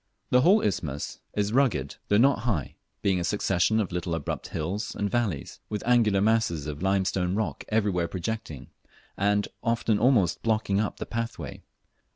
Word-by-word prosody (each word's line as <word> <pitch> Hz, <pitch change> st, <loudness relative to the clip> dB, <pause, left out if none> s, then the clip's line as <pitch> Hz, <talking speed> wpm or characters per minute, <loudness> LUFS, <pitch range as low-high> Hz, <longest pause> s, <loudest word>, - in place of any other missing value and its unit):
The 125 Hz, -, +6 dB
whole 195 Hz, +9 st, +5 dB
isthmus 75 Hz, -7 st, -2 dB, 0.2 s
is 105 Hz, 0 st, 0 dB
very 120 Hz, -, +1 dB
rugged, 90 Hz, -, +1 dB
though 105 Hz, -, +3 dB
not 135 Hz, +5 st, +4 dB
high, 100 Hz, -, -2 dB, 0.3 s
being 95 Hz, -2 st, +2 dB
a -, -, -1 dB
succession 100 Hz, +2 st, +1 dB
of 100 Hz, -4 st, -1 dB
little 90 Hz, -1 st, -2 dB
abrupt 80 Hz, -3 st, -4 dB
hills 90 Hz, +8 st, -3 dB
anal 100 Hz, -, 0 dB
valleys, 105 Hz, -, -2 dB
with 105 Hz, -1 st, -3 dB
angular 115 Hz, -5 st, +4 dB
masses 110 Hz, -8 st, +1 dB
of 75 Hz, 0 st, -5 dB
limestone 95 Hz, -1 st, +1 dB
rock 110 Hz, 0 st, -2 dB
everywhere 100 Hz, -6 st, +1 dB
projecting, 85 Hz, -, -5 dB, 0.4 s
and 105 Hz, +1 st, +1 dB
often 115 Hz, -2 st, +1 dB
almost 110 Hz, -8 st, +3 dB
blocking 110 Hz, -3 st, +1 dB
up 105 Hz, -, -1 dB
the -, -, -5 dB
pathway. 115 Hz, 0 st, -5 dB
100 Hz, 165 wpm, -27 LUFS, 90-110 Hz, 0.4 s, The